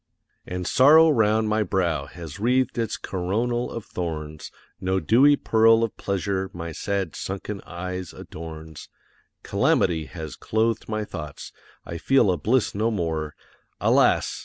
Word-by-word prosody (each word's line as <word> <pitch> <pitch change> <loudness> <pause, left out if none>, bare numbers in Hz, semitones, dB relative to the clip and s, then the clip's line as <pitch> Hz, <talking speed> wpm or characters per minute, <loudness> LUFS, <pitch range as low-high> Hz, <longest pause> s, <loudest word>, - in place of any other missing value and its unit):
And 90 0 -4
Sorrow 155 - +6
round 110 -3 +2
my 110 0 +1
brow 85 -8 0
has 80 0 -9
wreathed 125 +2 +1
its 115 -2 -1
coronal 115 +7 -2
of 115 - -6
thorns; 80 -3 -5 0.3
No 95 0 0
dewy 135 +9 +5
pearl 115 -2 +4
of 115 - -2
Pleasure 95 0 -2
my 85 -1 -6
sad 95 +1 -3
sunken 100 +1 -5
eyes 90 0 -5
adorns; 80 -1 -9 0.5
Calamity 80 -3 +1
has 80 -4 -8
clothed 110 0 -1
my 110 -1 -2
thoughts, 75 -6 -8 0.3
I 85 - -6
feel 130 -4 +3
a 90 - 0
bliss 115 - +1
no 110 +3 0
more, 80 -7 -2 0.4
Alas! - - +3
95 Hz, 135 wpm, -24 LUFS, 85-115 Hz, 0.5 s, Sorrow